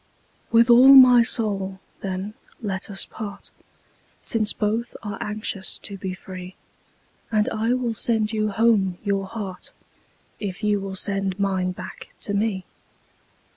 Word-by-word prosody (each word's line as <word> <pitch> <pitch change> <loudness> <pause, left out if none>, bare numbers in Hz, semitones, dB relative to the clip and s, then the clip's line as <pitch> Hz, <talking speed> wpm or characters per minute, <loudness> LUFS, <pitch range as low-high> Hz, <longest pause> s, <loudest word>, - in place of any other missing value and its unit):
With 230 0 +6
all 260 +3 +9
my 250 -2 +9
soul, 200 -5 -1 0.2
then, 195 +2 -4 0.3
let 200 -3 -4
us 195 -1 -3
part, 205 -2 -8 0.7
Since 215 -2 0
both 220 +3 -2
are 205 -2 -5
anxious 210 -2 -3
to 200 - -5
be 190 -1 -5
free; 185 0 -9 0.8
And 215 0 +2
I 225 +2 0
will 245 -2 -1
sand 220 0 0
you 215 -1 0
home 205 -4 +2
your 200 -2 -1
heart, 195 -4 -7 0.7
If 200 0 -5
you 210 -1 +2
will 195 -1 -5
send 195 -1 -2
mine 190 -2 0
back 180 +1 -10
to 205 - -4
me. 200 -2 -1
205 Hz, 135 wpm, -23 LUFS, 190-225 Hz, 0.8 s, all